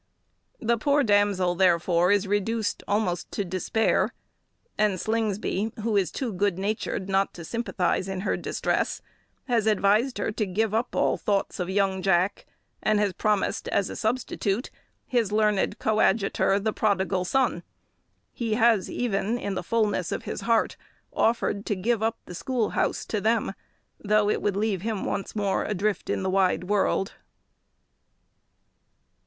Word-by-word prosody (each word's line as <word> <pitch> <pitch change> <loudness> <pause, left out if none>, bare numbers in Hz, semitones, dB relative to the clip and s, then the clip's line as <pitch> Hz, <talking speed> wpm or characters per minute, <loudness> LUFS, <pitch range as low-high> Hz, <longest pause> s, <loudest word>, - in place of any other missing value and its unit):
The 235 0 +1
poor 285 +4 +3
damsel, 205 -5 +3
therefore, 175 0 +3
is 205 0 +3
reduced 205 +2 -1
almost 200 -4 -1
to 205 - -1
despair; 185 +5 0 0.6
and 210 -3 +1
Slingsby, 220 -1 -1
who 225 -1 0
is 195 -3 +2
too 245 -5 -3
good 195 -1 0
natured 200 -1 -2
not 195 0 +1
to 170 - -8
sympathise 190 -4 -1
in 190 -1 -3
her - - 0
distress, - - -1 0.4
has 230 -4 +1
advised 215 +5 +2
her - - -1
to 215 0 -1
give 210 +3 0
up 225 +2 -1
all - - +2
thoughts 200 -2 -1
of 180 0 -2
young 190 -1 +1
Jack, 185 0 +1 0.3
and 215 -1 +2
has 205 -2 +1
promised 210 +1 0
as 200 -1 0
a - - -6
substitute 220 -1 -1 0.3
his 235 -5 0
learned 210 -2 +1
coadjutor, 205 -2 +2
the 215 +1 -1
prodigal 190 -3 +1
son. 265 +8 +1 0.7
He 225 -3 -1
has 225 -4 +3
even, 220 -1 -1
in 200 -4 -3
the - - -2
fulness 210 -3 0
of - - -3
his - - -5
heart, 230 -1 +1 0.4
offered 225 -3 +1
to 205 - +1
give 220 +4 0
up 225 +1 0
the - - -9
school 235 +4 -1
house - - -1
to 210 - -2
them, 220 -1 +1 0.5
though 210 0 +2
it - - -1
would 205 -2 0
leave 205 -3 0
him 220 -1 -2
once 200 - -3
more 200 -2 0
adrift 210 0 -1
in - - -1
the 190 - 0
wide 190 -1 +2
world. 195 0 0
205 Hz, 155 wpm, -26 LUFS, 190-220 Hz, 0.7 s, poor